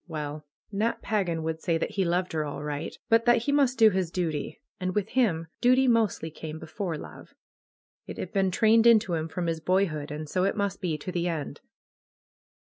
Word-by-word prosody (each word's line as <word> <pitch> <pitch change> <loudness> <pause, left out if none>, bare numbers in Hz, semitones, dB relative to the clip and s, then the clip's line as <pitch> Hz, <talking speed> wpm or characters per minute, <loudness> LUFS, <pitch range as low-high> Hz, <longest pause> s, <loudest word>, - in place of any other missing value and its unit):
Well, 150 -2 -5 0.2
Nat 215 +3 -1
Pagan 185 -6 -1
would 160 0 -3
say 165 -1 +1
that - - -2
he 195 - 0
loved 180 +1 0
her, 155 -1 0
all 145 0 -5
right; 145 -1 -4
but 230 +1 +4
that 240 -1 +4
he 285 - 0
must 275 -3 +3
do 220 -2 +7
his 185 -3 -1
duty. 160 -5 -3 0.2
And 185 -1 -2
with 210 0 0
him, 195 -11 +1 0.2
duty 255 +2 +4
mostly 220 -9 +1
came 155 0 -7
before 160 +1 -4
love. - - -11 0.7
It - - -7
had 185 - -6
been 195 -1 +2
trained 225 +4 +4
into 220 -5 +5
him 160 -1 -1
from 175 +2 -4
his 165 -1 -1
boyhood, 165 -4 0
and 150 +1 -5
so 180 +4 0
it 195 +3 0
must 200 -1 -2
be 170 -5 -1
to 170 +5 -6
the 175 0 -1
end. 160 -4 -4
180 Hz, 205 wpm, -27 LUFS, 160-215 Hz, 0.7 s, do